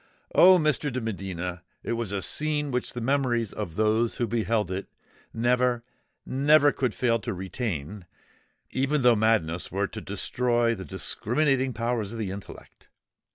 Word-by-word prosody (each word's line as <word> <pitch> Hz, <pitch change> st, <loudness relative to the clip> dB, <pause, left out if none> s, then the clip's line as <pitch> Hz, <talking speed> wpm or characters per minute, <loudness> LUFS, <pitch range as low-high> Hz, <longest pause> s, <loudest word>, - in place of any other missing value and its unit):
Oh! 185 Hz, +1 st, +8 dB
Mr. 150 Hz, -3 st, 0 dB
de 130 Hz, -, -2 dB
Medina, 90 Hz, -5 st, -4 dB, 0.2 s
it -, -, -3 dB
was 115 Hz, -4 st, -2 dB
a 100 Hz, -2 st, -2 dB
scene 150 Hz, -, +1 dB
which 125 Hz, 0 st, -2 dB
the 120 Hz, -, -4 dB
memories 120 Hz, -4 st, 0 dB
of 80 Hz, -, -5 dB
those 110 Hz, +2 st, +1 dB
who 120 Hz, -, 0 dB
beheld 110 Hz, -3 st, 0 dB
it, 95 Hz, +1 st, -4 dB, 0.4 s
never—never 125 Hz, +4 st, +1 dB
could 130 Hz, -6 st, -2 dB
fail 115 Hz, -2 st, +1 dB
to 115 Hz, -1 st, -4 dB
retain—even 105 Hz, -, -5 dB
though 120 Hz, -1 st, +6 dB
madness 105 Hz, -6 st, +1 dB
were 100 Hz, +2 st, 0 dB
to -, -, -8 dB
destroy 120 Hz, -1 st, 0 dB
the 95 Hz, -4 st, -7 dB
discriminating 130 Hz, +7 st, 0 dB
powers 115 Hz, -2 st, -2 dB
of -, -, -6 dB
the 105 Hz, -4 st, -3 dB
intellect! 100 Hz, +1 st, -11 dB
115 Hz, 145 wpm, -26 LUFS, 100-130 Hz, 0.4 s, Oh